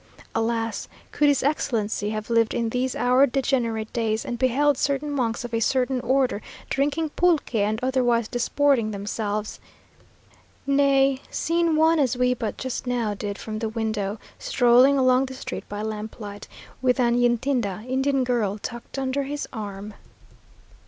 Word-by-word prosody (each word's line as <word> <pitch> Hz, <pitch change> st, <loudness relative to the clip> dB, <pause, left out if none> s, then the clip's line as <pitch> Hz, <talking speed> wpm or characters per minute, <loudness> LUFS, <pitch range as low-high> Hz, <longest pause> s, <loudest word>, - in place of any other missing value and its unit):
Alas! 225 Hz, 0 st, -1 dB, 0.2 s
could 295 Hz, -, +2 dB
his 285 Hz, -2 st, +3 dB
Excellency 225 Hz, -7 st, 0 dB
have 215 Hz, +1 st, -4 dB
lived 230 Hz, -1 st, +2 dB
in 230 Hz, -1 st, 0 dB
these 250 Hz, +2 st, -1 dB
our 250 Hz, +3 st, +4 dB
degenerate 240 Hz, -5 st, -1 dB
days, 220 Hz, -2 st, -1 dB
and 240 Hz, -1 st, -4 dB
beheld 275 Hz, +3 st, +3 dB
certain 280 Hz, +2 st, -1 dB
monks 240 Hz, -4 st, -1 dB
of 240 Hz, -, -8 dB
a 230 Hz, -, +1 dB
certain 255 Hz, +2 st, +1 dB
order 255 Hz, -3 st, +1 dB, 0.3 s
drinking 290 Hz, +3 st, 0 dB
pulque 340 Hz, -3 st, +1 dB
and 215 Hz, 0 st, +1 dB
otherwise 245 Hz, -3 st, +2 dB
disporting 245 Hz, -1 st, +1 dB
themselves! 210 Hz, +1 st, -3 dB, 1.1 s
nay, 275 Hz, -1 st, +3 dB
seen 335 Hz, -1 st, +1 dB
one, 320 Hz, +1 st, +4 dB
as 255 Hz, -3 st, +1 dB
we 250 Hz, 0 st, +3 dB
but 225 Hz, -3 st, -4 dB
just 260 Hz, -1 st, -4 dB
now 235 Hz, -4 st, 0 dB
did 200 Hz, 0 st, -5 dB
from 215 Hz, -1 st, -5 dB
the 225 Hz, -1 st, -2 dB
window, 215 Hz, -2 st, -2 dB, 0.2 s
strolling 250 Hz, +2 st, +4 dB
along 255 Hz, 0 st, +4 dB
the 260 Hz, -, -8 dB
street -, -, -7 dB
by 205 Hz, +1 st, -4 dB
lamplight, 210 Hz, -1 st, -6 dB, 0.3 s
with 255 Hz, 0 st, +2 dB
an 240 Hz, -1 st, +3 dB
Yntida 240 Hz, -4 st, 0 dB
(Indian 265 Hz, +1 st, +1 dB
girl) 230 Hz, -5 st, 0 dB
tucked 235 Hz, +5 st, -7 dB
under 270 Hz, +1 st, -1 dB
his 285 Hz, +1 st, -4 dB
arm!.... 205 Hz, -2 st, -6 dB
245 Hz, 150 wpm, -24 LUFS, 220-270 Hz, 1.1 s, our